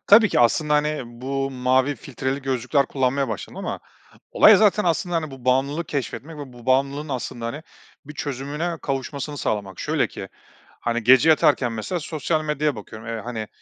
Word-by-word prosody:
Tabii 210 +1 +7
ki - - +2
aslında, 150 +6 +3
hani, 150 0 +1
bu 135 +3 -3
mavi 130 +2 +1
filtreli 135 +3 -4
gözlükler 130 +1 +1
kullanmaya 135 0 0
başladım 110 - -6
ama - - -4 0.5
olay - - +7
zaten 210 0 +3
aslında, 175 0 0
hani, 155 -2 -2
bu 135 -2 -12
bağımlılığı 135 +6 +1
keşfetmek 145 +1 -5
ve 140 -3 -8
bu 120 0 -14
bağımlılığın 140 +3 +1
aslında, 120 -3 -4
hani, 145 +7 -5 0.4
bir 150 +1 -10
çözümüne 150 +4 -3
kavuşmasını 140 +2 -4
sağlamak. 100 -6 -3
Şöyle - - +1
ki, - - -8 0.5
hani, 120 0 -1
gece 130 +6 +6
yatarken 145 -5 +4
mesela 115 - -3
sosyal 155 0 -2
medyaya 150 -2 0
bakıyorum. 110 +2 -9
Eee, 115 -1 -3
hani, 110 -3 -5
135 Hz, 165 wpm, -23 LUFS, 125-150 Hz, 0.5 s, Tabii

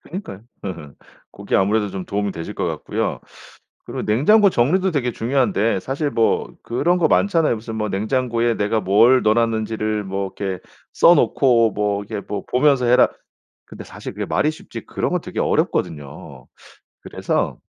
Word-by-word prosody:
그니까요. 170 - -8 0.2
으흠. 85 -7 -7 0.4
고게 - - -6
아무래도 105 +2 +1
좀 95 -1 -6
도움이 100 -1 -2
되실 85 0 -7
것 - - -2
같고요. - - -3 0.6
그리고 - - -5
냉장고 195 - +4
정리도 180 +9 +2
되게 125 -6 -1
중요한데 115 -4 0
사실 140 - -2
뭐 115 - 0
그런 170 +10 +1
거 170 - +3
많잖아요. 165 -10 +2
무슨 110 0 -7
뭐 105 -1 -2
"냉장고에 115 +3 0
내가 105 +2 0
뭘 110 +7 +4
넣어 110 0 +3
놨는지를 110 -2 -1
뭐 95 0 -4
이렇게 95 -2 -4 0.3
써 175 - +6
놓고 120 -8 +3
뭐 105 -1 -1
이렇게 105 -1 -6
뭐 105 - -5
보면서 130 -1 +3
해라." 125 +1 +5 0.6
근데 - - -11
사실 - - -9
그게 - - -4
말이 155 - +1
쉽지 155 - -9
그런 - - -2
거 - - 0
되게 - - -8
어렵거든요. 75 -3 -2 0.5
그래서 - - -2
115 Hz, 350 characters per minute, -20 LUFS, 100-130 Hz, 0.6 s, 써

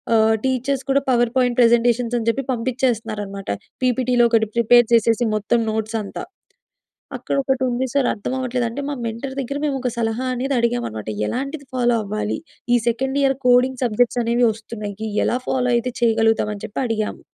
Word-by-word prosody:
ఆహ్ 220 0 +4
టీచర్స్ 260 +1 0
కూడా 275 +1 +3
power 240 -1 +2
point 250 -2 +2
presentations 235 0 +3
అని 225 - -5
చెప్పి 270 +4 -1
పంపించేస్తున్నారన్నమాట. 225 -5 -2 0.3
పీపీటీలో 250 -1 +3
ఒకటి 220 -2 +3
ప్రిపేర్ 240 0 +5
చేసేసి 230 +1 +3
మొత్తం 215 +3 +1
నోట్స్‌ 220 +1 -2
అంతా. 200 - -6 0.9
అక్కడ - - -3
ఒకటి 265 -1 0
ఉంది 245 +2 -1
సార్ 275 -3 +3
అర్థం 215 +4 -5
అవ్వట్లేదు 250 -1 -1
అంటే, 235 +5 -5
మా - - -2
మెంటార్ 230 +4 -5
దగ్గర 275 +2 -4
మేము 285 -2 0
ఒక 255 - -1
సలహా 230 +2 -1
అనేది 265 +3 -2
అడిగామన్నమాట. 235 - -2 0.2
ఎలాంటిది 275 +3 -4
ఫాలో 240 -2 +2
అవ్వాలి? 210 +1 -3 0.3
ఈ - - +6
సెకండ్ 265 +4 0
ఇయర్ 270 0 +3
కోడింగ్ 250 +1 +4
సబ్జెక్ట్స్ 245 +1 +1
అనేవి 235 +1 +2
వస్తున్నాయి, 215 -1 -6 0.2
ఎలా 245 - +1
ఫాలో 250 -1 0
అయితే 240 +1 0
చేయగలుగుతాం 225 -2 +2
అని 200 - -11
చెప్పి 220 - -4
అడిగాము. 220 -2 -2
240 Hz, 165 wpm, -21 LUFS, 225-255 Hz, 0.9 s, ఈ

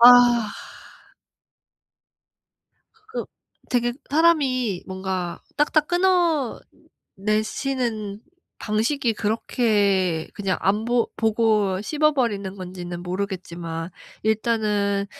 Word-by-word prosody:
아. 240 -2 +8 2.6
그 440 - -4 0.5
되게 240 -1 +1 0.2
사람이 270 - +2
뭔가 185 -2 -3 0.2
딱딱 300 +1 +3
끊어내시는 250 - -1 0.4
방식이 230 +4 0
그렇게 205 -6 +1
그냥 195 -3 -1
안 205 +3 +1
보 240 0 +1
보고 215 -4 +2
씹어버리는 240 -10 +1
건지는 180 -2 -6
모르겠지만 175 -3 -4 0.3
일단은 210 -2 +1
215 Hz, 175 characters per minute, -23 LUFS, 190-245 Hz, 2.6 s, 아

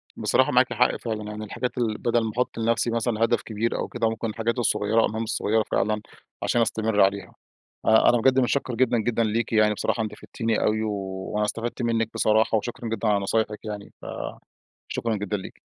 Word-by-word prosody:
بصراحة، - - +2
معاكِ - - +3
حق - - +3
فعلًا. 110 -2 -4
يعني 105 0 -6
الحاجات 120 +4 -4
ال 110 -3 0
بدل 120 -1 +1
ما 110 - -2
أحُط 125 - -1
لنفسي 115 +1 +1
مثلًا 115 -1 0
هدف 115 0 +2
كبير 110 +1 -2
أو - - -2
كده، 115 -2 0
ممكن 115 0 -3
الحاجات 115 +3 -2
الصغيرة، 110 -1 +2
المهام 110 +1 -2
الصغيرة 110 0 +1
فعلًا، 105 +2 +1 0.4
عشان 120 - +2
أستمِر 110 -2 +1
عليها.أ 95 -1 -2 0.2
أنا 120 - +4
بجد 130 +1 +4
مُتشكر 125 0 0
جدًا 120 0 +2
جدًا 115 +1 +1
ليكِ 110 +1 -1
يعني، 110 -1 +4
بصراحة 115 +2 -1
أنتِ 110 - -4
فدتِني 115 0 -2
أوي، 110 +1 +1
وأنا 100 0 -2
استفدت 115 +3 -3
منِك 115 -1 +1
بصراحة. 110 +1 +3
وشكرًا 120 +2 -4
جدًا 115 0 -1
على 105 -1 +3
نصايحِك 105 +1 -1
يعني، 105 -1 -7 1.0
فشكرًا 115 -2 -1
جدًا 105 0 -2
ليكِ. 95 - -9
110 Hz, 185 wpm, -25 LUFS, 105-115 Hz, 1.0 s, أنا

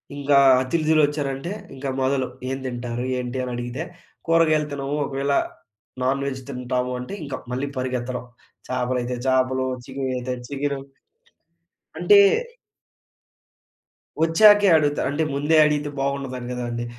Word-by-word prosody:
ఇంకా 145 0 +1 0.3
అతిధులొచ్చారంటే 150 +1 0 0.2
ఇంకా 135 +1 -4
మొదలు, 130 0 +1 0.2
ఏం 135 - -2
తింటారు 120 -1 -4
ఏంటి? 125 +1 -4
అని 125 - -4
అడిగితే, 120 +5 -4 0.4
"కూరగాయలు 155 -2 +3
తినము. 140 +1 -3
ఒకవేళ 140 +1 -1 0.7
నాన్ 135 +2 +1
వేజ్ 135 -1 -4
తింటాము." 125 -1 -2
అంటే 125 +9 -7
ఇంకా 140 - -5 0.2
మళ్ళీ 135 +3 -2
పరిగెత్తడం! 125 -1 -3 0.4
చాపలైతే 125 -1 -1
చాపలు, 130 0 +2 0.2
చికెను 135 -1 -3
అయితే 125 +1 -3
చికెను. 140 0 -2 1.2
అంటే 410 -1 +6 2.1
వచ్చాకే 205 +4 +6
అడుగుతారు. 145 -1 +1
అంటే 155 - 0
ముందే 145 +3 +2
అడిగితే 150 -1 0
బాగుండదు 135 -2 -3
కదండీ. 120 -1 -3
135 Hz, 115 wpm, -23 LUFS, 125-145 Hz, 2.1 s, అంటే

